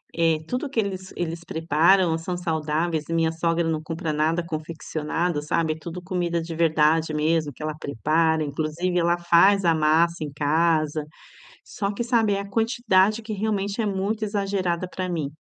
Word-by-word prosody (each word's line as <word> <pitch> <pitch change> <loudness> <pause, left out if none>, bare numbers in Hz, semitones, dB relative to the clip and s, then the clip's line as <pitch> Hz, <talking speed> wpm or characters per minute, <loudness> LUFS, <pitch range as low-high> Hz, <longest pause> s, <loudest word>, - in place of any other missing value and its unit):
eh 165 -2 +2
tudo 255 +3 -3
que 265 - -1
eles 190 -3 -3
eles 170 -1 -3
preparam 165 +2 +3
são 175 +2 -4
saudáveis 160 -1 -1
e - - -1
minha 165 -1 +2
sogra 165 0 0
não 160 -1 -1
compra 160 0 -4
nada 155 +3 +1
confeccionado, 160 0 -3
sabe, 155 +1 0
tudo 170 +2 -7
comida 175 -2 -1
de 165 0 -6
verdade 160 -1 +2
mesmo 155 0 +1
que 140 - -15
ela 155 -1 -3
prepara, 155 +3 +1
inclusive 155 +5 -2
ela 170 0 +2
faz 175 +3 +4
a 165 - +5
massa 160 +2 +2
em 150 - -5
casa. 155 +1 +1 0.6
Só 200 0 -3
que 210 - -3
sabe, 230 -3 +2
é 200 - -1
a 200 - -7
quantidade 215 -1 +2
que 220 0 -6
realmente 205 0 -1
é - - -1
muito 205 +2 -1
exagerada 195 -4 -1
pra 185 0 -4
mim. 160 -5 -2
170 Hz, 170 wpm, -24 LUFS, 155-190 Hz, 0.6 s, a